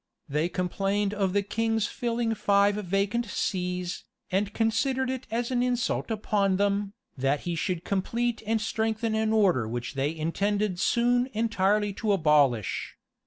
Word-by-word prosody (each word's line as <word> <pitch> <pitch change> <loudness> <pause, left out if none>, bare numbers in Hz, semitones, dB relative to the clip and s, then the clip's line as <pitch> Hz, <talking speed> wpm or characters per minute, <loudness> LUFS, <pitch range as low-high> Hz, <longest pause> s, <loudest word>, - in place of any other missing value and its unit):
[*] - - -53
They 150 +4 0
complained 195 +3 -1
of 195 -3 0
the 200 0 +2
king's 225 +1 0
filling 235 -1 -1
five 200 -1 +3
vacant 205 +4 -1
sees, 180 -2 -2 0.3
and 200 +2 +1
considered 260 +4 0
it 260 -1 -5
as 235 +2 -2
an 245 -1 +1
insult 245 -1 0
upon 205 -3 +1
them, 200 0 0 0.2
that 135 +2 0
he 175 - -3
should 175 +1 -2
complete 230 +4 -1
and 225 0 +2
strengthen 220 +1 -1
an 220 0 +1
order 185 - +3
which 120 +2 -4
they 140 +3 -1
intended 195 +4 -1
soon 245 +3 +2
entirely 210 -2 +1
to 210 0 0
abolish. 145 - +2
205 Hz, 150 wpm, -27 LUFS, 180-225 Hz, 0.3 s, five